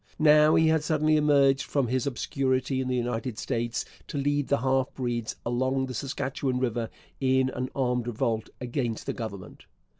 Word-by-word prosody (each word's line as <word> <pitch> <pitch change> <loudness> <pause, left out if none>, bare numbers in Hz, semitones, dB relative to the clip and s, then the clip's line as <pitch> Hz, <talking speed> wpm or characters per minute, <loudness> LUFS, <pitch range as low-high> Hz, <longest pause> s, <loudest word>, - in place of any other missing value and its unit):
Now 150 0 +6
he 160 0 +4
had 160 -1 +2
suddenly 155 0 +2
emerged 140 -2 +4
from 140 -3 0
his 130 +2 0
obscurity 130 -1 0
in 130 - -3
the 130 - 0
United 120 -1 -2
States 120 0 -2 0.2
to - - -5
lead 145 0 0
the 140 - +2
half 130 0 +1
breeds 120 -3 -2
along 130 +2 0
the 130 - -6
Saskatchewan 135 0 -2
river 120 -3 -1 0.3
in 130 -1 +2
an 130 +1 -3
armed 125 -3 0
revolt 115 -1 -1
against 120 -2 -3
the - - -2
Government. 105 -6 -8
130 Hz, 170 wpm, -27 LUFS, 120-140 Hz, 0.3 s, Now